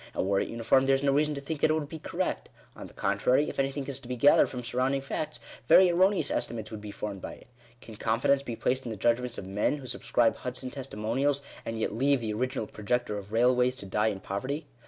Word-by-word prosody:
And - - 0
were 100 0 +2
it - - -2
uniform, 115 +4 +2
there 135 - +5
is 135 - -2
no 140 - +3
reason 150 +2 +2
to 140 - -5
think 145 +1 -5
that - - +4
it 155 - +3
would 155 -2 -2
be 160 +2 -8
correct. - - -3 0.3
On - - -9
the - - -17
contrary, 135 +4 +2
if - - -6
anything 135 +1 -1
is 135 -1 -3
to 130 - -12
be 125 - -3
gathered 140 +4 +5
from 125 -1 -6
surrounding 130 +3 0
facts, 135 -2 -4 0.3
very 185 +5 +7
erroneous 185 -3 +2
estimates 110 -2 -2
would 110 -1 -7
be 105 - -8
formed 100 -1 -5
by - - -6
it. - - -18 0.3
Can 110 -2 -11
confidence 115 +6 +2
be 120 -4 -5
placed 130 +3 0
in - - -5
the 110 - -5
judgments 120 +3 0
of - - -6
men 105 +9 0
who 140 - -10
subscribe 120 -2 +1
Hudson 130 0 -5
testimonials, 135 +2 -1 0.2
and 115 - -3
yet 110 - -1
leave 135 +4 +2
the 110 -2 -3
original 125 +1 -2
projector 105 +2 -2
of 100 +1 -12
railways 125 +2 +3
to 100 - -6
die 105 +3 +1
in 100 -3 -2
poverty 130 - -4
125 Hz, 240 wpm, -28 LUFS, 110-140 Hz, 0.3 s, very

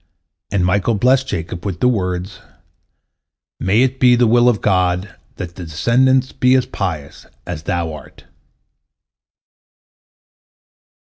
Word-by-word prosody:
And 95 -3 +1
Michael 100 +5 +1
blessed 130 +5 +2
Jacob 85 -2 -5
with 95 -4 -4
the 125 - +3
words, 95 -4 -2 1.2
"May 105 +6 +2
it 130 0 -1
be 125 -1 +5
the 120 0 +3
will 120 +2 +4
of 110 -4 0
God 90 -1 0 0.2
that 85 -1 -7
thy 90 - -8
descendants 125 +11 +2
be 125 +1 +2
as 130 - +2
pious 80 -8 -5 0.2
as 85 -3 -5
thou 80 0 -2
art." 75 -3 -13
100 Hz, 125 wpm, -18 LUFS, 90-125 Hz, 1.2 s, be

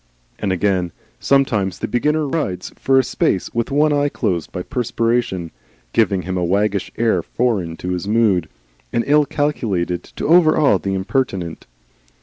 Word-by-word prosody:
And 100 - -1
again, 95 -1 0 0.3
sometimes 110 -10 +1
the - - -3
beginner 150 +6 +1
rides 100 - -3
for 135 0 +2
a 130 - +5
space 120 -6 -1
with 115 0 -1
one 150 +2 +3
eye 145 0 +2
closed 90 - -2
by 90 - -4
perspiration, 115 - -1 0.4
giving 100 -4 +2
him 95 0 -3
a 90 - 0
waggish 100 +2 0
air 115 -1 +2
foreign 100 -10 -1
to 90 - -5
his 90 +1 -3
mood 105 -7 +2 0.4
and 115 - +1
ill 150 0 +4
calculated 100 - -1
to - - -7
overawe 155 - +5
the 95 +1 -2
impertinent. 95 - -2
105 Hz, 150 wpm, -19 LUFS, 90-135 Hz, 0.4 s, a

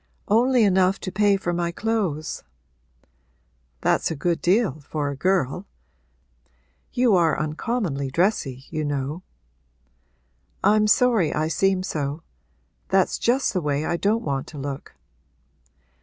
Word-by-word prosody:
'Only 240 +3 +4
enough 190 -1 +3
to 185 - -4
pay 205 0 +3
for 175 -2 -2
my 170 0 -1
clothes.' 190 -7 -2 1.4
'That's - - +1
a 160 - -3
good 170 +3 -1
deal, 190 -2 +2
for 145 0 -3
a - - -5
girl. 180 +2 0 1.2
You 245 -4 +3
are 170 -3 +2
uncommonly 155 - -2
dressy, 135 - 0
you 155 -2 -2
know.' 145 +3 -3 1.4
'I'm 215 0 +4
sorry 220 -7 +3
I 155 +1 0
seem 190 +2 +1
so. 150 -2 -3 0.6
That's - - +2
just 255 +2 +1
the 185 - 0
way 145 0 -1
I 170 - 0
don't 210 +6 0
want 135 -2 -2
to 155 - -10
look.' 140 0 -6
175 Hz, 125 wpm, -24 LUFS, 150-210 Hz, 1.4 s, Only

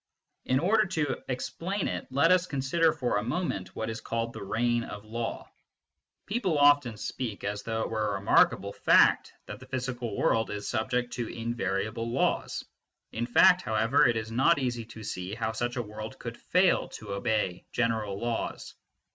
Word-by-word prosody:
In 130 - +2
order 210 +8 +3
to 155 -7 -1
explain 175 +9 -2
it - - -4
let 140 +6 +3
us 180 0 +4
consider 150 +4 +2
for 125 -8 -1
a 105 - -1
moment 125 - -3
what 110 - -3
is 115 0 -5
called 115 0 -3
thecfSgn 120 +3 -1
oflaw^ 110 +3 -5 0.8
People 195 -7 0
often 145 -6 +4
speak 110 -1 -5
as 100 0 -2
though 110 0 -2
it - - -4
were 110 -1 0
a - - -3
remarkable 100 0 +3
fact - - +4
that - - -8
the 130 - -13
physical 125 -4 -3
world 115 0 +2
is 105 0 -5
subject 125 +2 -1
to 120 -2 -3
invariable 115 0 -2
laws. 125 +3 0 0.5
In 120 +2 -3
fact, 180 +9 +6
however, 110 +1 +3
it 115 - +1
is 110 0 -4
not 135 +8 +4
easy 120 -4 -2
to 110 -1 -11
see 90 0 -4
how 110 -1 -2
such 120 +2 -2
a 120 - -1
world 110 +1 -8
could 115 -1 -6
& - - -35
fail 180 0 +4
to 105 -2 -7
obey 100 -3 -1
general 110 -4 -1
laws. 120 0 -3
120 Hz, 170 wpm, -28 LUFS, 110-135 Hz, 0.8 s, fact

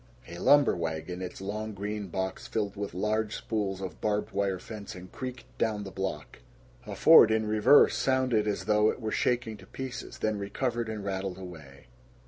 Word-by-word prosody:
A 85 +1 -8
lumber 145 +8 +5
wagon, 85 +2 -4
its 90 +1 -6
long 105 +2 -4
green 105 +1 -4
box 95 +1 -4
filled 105 -2 -2
with 100 -3 -5
large 105 +2 0
spools 100 -4 -2
of 95 -4 -7
barbed 105 -1 0
wire 100 -1 0
fencing, 95 -2 -9
creaked 125 -2 -6 0.2
down 110 -2 0
the 95 - -7
block. 95 -6 -5 0.5
A - - -5
Ford, 160 -9 +8
in 110 0 +1
reverse, 110 +7 +5
sounded 130 -5 +2
as 105 - -2
though 105 0 +4
it - - -3
were 110 -2 -3
shaking 120 -3 0
to - - -15
pieces, 130 -2 -7
then 110 -1 -1
recovered 115 +3 -2
and 105 -2 -5
rattled 95 -1 -3
away. 80 -7 -11
105 Hz, 175 wpm, -29 LUFS, 95-110 Hz, 0.5 s, Ford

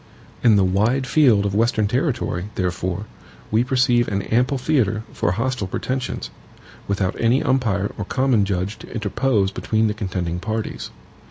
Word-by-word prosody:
In 115 -3 +6
the 100 - +4
wide 110 +8 +1
field 125 -7 +4
of 100 - -1
Western 110 0 +2
territory, 120 - -1
therefore, 90 +2 -2 0.5
we 110 +2 +3
perceive 125 -2 +2
an 100 -2 -1
ample 125 +6 +1
theatre 120 -6 +1
for - - 0
hostile 115 0 -1
pretensions, 130 +6 -3 0.6
without 100 -2 0
any 120 +4 +3
umpire 110 -7 +1
or 100 - -2
common 130 -3 +2
judge 100 +1 -2
to - - -12
interpose 110 -2 0
between 110 +2 0
the 105 - +1
contending 90 -4 -3
parties. 110 +2 -4
110 Hz, 150 wpm, -22 LUFS, 100-125 Hz, 0.6 s, In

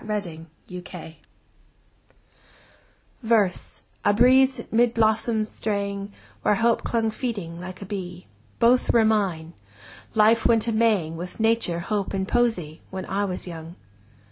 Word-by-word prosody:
Youth 210 -2 -2 0.4
and 180 0 -8
Age 160 -2 -9 2.1
VERSE, 220 -6 0 0.2
a 205 - +4
breeze 260 +2 +5
'mid 235 +1 +3
blossoms 220 -1 +1
straying, 200 -1 -3 0.3
Where 210 - +3
Hope 230 +2 +2
clung 225 -2 0
feeding, 200 -9 -4
like 185 +2 -8
a - - -8
bee— 180 -3 -6 0.3
Both 245 +2 +4
were 230 -2 +4
mine! 185 -7 0 0.6
Life 220 +1 +4
went 230 -1 +3
a - - +1
maying 210 -8 +1
With 180 +5 -8
Nature, 225 -6 +1
Hope, 200 +1 -2
and 190 0 -2
Poesy, 215 -11 0
When 190 0 -5
I 200 +1 -1
was 185 -2 -5
young! 165 -1 -8
210 Hz, 135 wpm, -24 LUFS, 180-230 Hz, 2.1 s, breeze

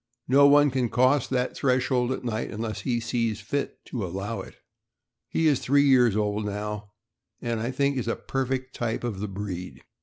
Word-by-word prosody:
No 140 +2 +6
one 145 0 +6
can 125 -2 0
cross 130 +3 +3
that 125 -1 -1
threshold 125 -1 +1
at 130 - -3
night 115 -2 -2
unless 110 0 -4
he 120 -3 0
sees 115 -2 -1
fit 140 +8 -4
to 120 -5 -4
allow 95 +5 -4
it. - - -12 0.7
He 165 - 0
is 145 -4 +4
three 140 +2 +3
years 125 -6 +5
old 105 0 0
now, 105 0 -4 0.5
aud 120 -2 -1
I 115 +2 -2
think 140 +1 0
is 120 - -4
a 115 - 0
perfect 130 0 -3
type 115 -1 -2
of 115 -5 -3
the 105 - -3
breed. 95 -2 -6
120 Hz, 185 wpm, -26 LUFS, 105-130 Hz, 0.7 s, No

